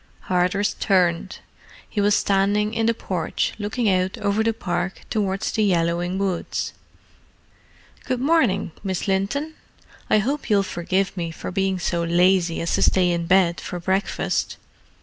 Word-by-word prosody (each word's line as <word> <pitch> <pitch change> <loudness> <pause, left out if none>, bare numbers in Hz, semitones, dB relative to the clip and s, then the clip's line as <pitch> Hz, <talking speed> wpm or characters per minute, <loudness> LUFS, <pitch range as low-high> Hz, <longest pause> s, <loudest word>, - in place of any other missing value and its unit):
Hardress 185 +3 +1
turned. 180 -2 +1 0.5
He 205 - -2
was 205 0 +4
standing 205 +1 +1
in 225 0 +1
the 230 - +3
porch, 180 -6 -2
looking 215 +3 -1
out 185 -1 +1
over 205 +1 0
the 225 +1 +2
park 180 -3 -3
towards 195 -3 -1
the 215 - +1
yellowing 175 -1 +1
woods. 190 -3 -2 1.3
"Good 255 - -1
morning, 255 - +2
Miss 190 0 -2
Linton. 200 +12 -1 0.6
I - - +5
hope 270 +6 -1
you'll 200 -2 +4
forgive 185 +1 -1
me 170 -3 -3
for 165 - -7
being 190 0 0
so 175 -1 -1
lazy 175 0 +2
as 170 - -1
to - - +1
stay 180 -2 +3
in 170 -1 -2
bed 185 -2 +3
for 180 - -5
breakfast. 190 +3 -1
190 Hz, 150 wpm, -23 LUFS, 180-210 Hz, 1.3 s, I